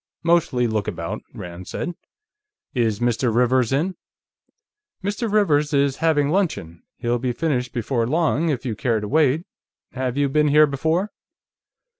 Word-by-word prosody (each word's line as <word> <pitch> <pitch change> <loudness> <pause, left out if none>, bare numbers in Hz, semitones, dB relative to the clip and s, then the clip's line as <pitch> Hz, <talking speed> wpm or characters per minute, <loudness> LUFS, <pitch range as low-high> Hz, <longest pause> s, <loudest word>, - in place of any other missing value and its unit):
"Mostly 165 -7 +2
look 110 -3 -1
about," - - -4
Rand 90 +1 -9
said. 175 - -4 0.8
"Is 115 -4 0
Mr. 120 0 +1
Rivers 125 +1 +2
in?" 165 +8 0 1.1
"Mr. 205 +3 -2
Rivers 150 -8 +2
is 140 -1 +2
having 155 -3 +2
luncheon. 155 - -1 0.2
He'll 120 0 -1
be 125 0 -1
finished 125 -3 -1
before 120 0 -1
long, 160 +2 +1
if 135 -3 -2
you 115 -4 -2
care 115 -1 0
to 105 - -5
wait.... 150 +3 +2 0.5
Have 130 0 -3
you 145 - +3
ever 135 - -3
been 150 0 +4
here 150 +1 +6
before?" 160 +8 -1
135 Hz, 150 wpm, -22 LUFS, 120-160 Hz, 1.1 s, here